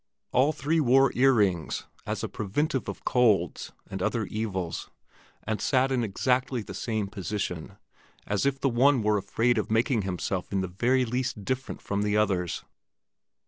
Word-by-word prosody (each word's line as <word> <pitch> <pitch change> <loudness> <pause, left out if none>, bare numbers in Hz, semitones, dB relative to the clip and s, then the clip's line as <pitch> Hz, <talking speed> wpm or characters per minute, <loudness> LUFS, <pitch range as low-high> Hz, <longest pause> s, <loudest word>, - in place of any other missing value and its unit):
All 130 +4 +4
three 155 +2 0
wore 135 -1 +5
ear 135 +2 +5
rings 95 - +1 0.2
as - - -2
a - - 0
preventive 130 +7 -2
of - - -8
colds 105 - +2 0.2
and - - -5
other - - 0
evils, 95 -6 -3 0.5
and 110 -1 -2
all - - -5
sat 130 0 +2
in 125 -2 +1
exactly 125 +3 0
the - - -8
same 110 -3 -2
position, 95 -1 -4 0.5
as 105 -1 0
if 135 -1 +1
the 135 - +1
one 130 0 +4
were 105 0 +3
afraid 115 +4 +1
of - - -3
making 115 +2 +2
himself 95 -1 -3
in 100 -1 +1
the 95 - -2
very 125 +8 +1
least 120 -4 -2
different 130 +3 -3
from 100 0 -1
the 105 0 +1
others. 95 -5 0
110 Hz, 170 wpm, -27 LUFS, 100-130 Hz, 0.5 s, wore